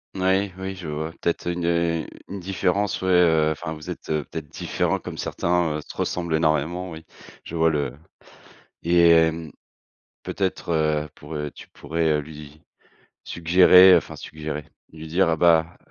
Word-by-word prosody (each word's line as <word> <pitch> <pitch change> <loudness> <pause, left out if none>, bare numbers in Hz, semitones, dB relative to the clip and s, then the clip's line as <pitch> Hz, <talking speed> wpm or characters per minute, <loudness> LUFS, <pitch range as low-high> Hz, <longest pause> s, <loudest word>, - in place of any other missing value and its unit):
Moui, 95 +1 +1
oui, 95 0 -5
je 90 -4 -8
vois 80 +2 -4
peut-être 85 0 -1
une, 85 -1 -3
heu, 85 -2 0 0.2
une 100 0 -6
différence, 95 +2 -1
ouais, 95 - -1
heu, 80 -3 +4
enfin 80 +1 -5
vous 75 -1 -10
êtes - - -7
peut-être 75 0 -4
différents - - -2
comme - - -8
certains, 85 -3 0
heu, - - -6
se - - -10
ressemble 85 -2 -2
énormément, 80 +3 0
oui, 80 0 -10 0.4
je 85 - -8
vois 80 0 +3
le 75 -3 -1 0.9
et 85 0 +5
hem, 80 -1 +2 0.7
peut-être 80 -5 -1
pourrais 75 -1 -6
tu - - -14
pourrais 80 0 -1
lui 75 0 -12 0.6
suggérer, 90 +2 +6
enfin - - -1
suggérer, 75 -1 -6 0.3
lui 80 0 -10
dire, 85 +2 +2
heu, 80 - +2
bah: 85 -1 +3
80 Hz, 150 wpm, -23 LUFS, 75-90 Hz, 0.9 s, suggérer